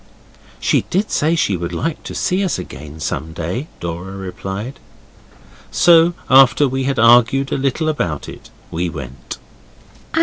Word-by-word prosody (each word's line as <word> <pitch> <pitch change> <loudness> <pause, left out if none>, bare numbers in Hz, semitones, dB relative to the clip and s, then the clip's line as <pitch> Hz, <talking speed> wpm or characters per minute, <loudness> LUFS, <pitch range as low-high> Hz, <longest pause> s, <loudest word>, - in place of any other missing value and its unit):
'She - - +2
did 200 +4 0
say 160 +3 +2
she 105 - +1
would 85 -1 -4
like 165 -1 -2
to - - -8
see 185 +2 0
us 185 - 0
again 75 +2 -9
some 80 +1 -4
day,' 90 - -4
Dora 85 +3 -5
replied. 95 +6 -6 0.9
So 170 0 +5
after 135 +2 +6
we 130 0 -2
had 135 -1 -1
argued 120 +4 +5
a - - +1
little 140 +4 -1
about 85 - -2
it - - -11 0.2
we 85 +1 -1
went. 70 -4 -8
120 Hz, 145 wpm, -18 LUFS, -, 0.9 s, after